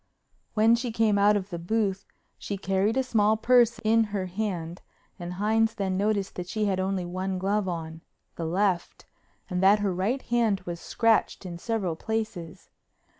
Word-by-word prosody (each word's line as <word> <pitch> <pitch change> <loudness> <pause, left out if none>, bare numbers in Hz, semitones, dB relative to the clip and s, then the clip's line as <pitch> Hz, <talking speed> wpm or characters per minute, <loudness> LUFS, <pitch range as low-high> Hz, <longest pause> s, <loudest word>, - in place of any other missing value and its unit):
When 220 +1 +5
she 235 0 0
came 220 -2 +2
out 205 +1 +5
of 195 0 -6
the 170 - -4
booth 195 +1 -1 0.3
she 200 - -4
carried 195 +4 0
a 265 - +2
small 220 -3 +2
purse 240 0 +4
in 225 +1 +4
her 200 -3 -3
hand 180 -3 -4 0.4
and 175 0 -5
Hines 220 +3 +1
then 195 -3 -1
noticed 200 0 0
that 180 -1 -4
she 215 +2 -1
had 190 -2 0
only 190 -1 -1
one 185 +2 -3
glove 195 +2 0
on—the 165 -1 -7
left—and 180 0 -3
that 195 +2 +6
her 205 -2 -1
right 210 +9 -1
hand 230 -5 +1
was 175 -2 -6
scratched 225 -2 +1
in 170 -2 -6
several 200 -6 -2
places. 215 -5 -5
200 Hz, 165 wpm, -27 LUFS, 185-220 Hz, 0.4 s, that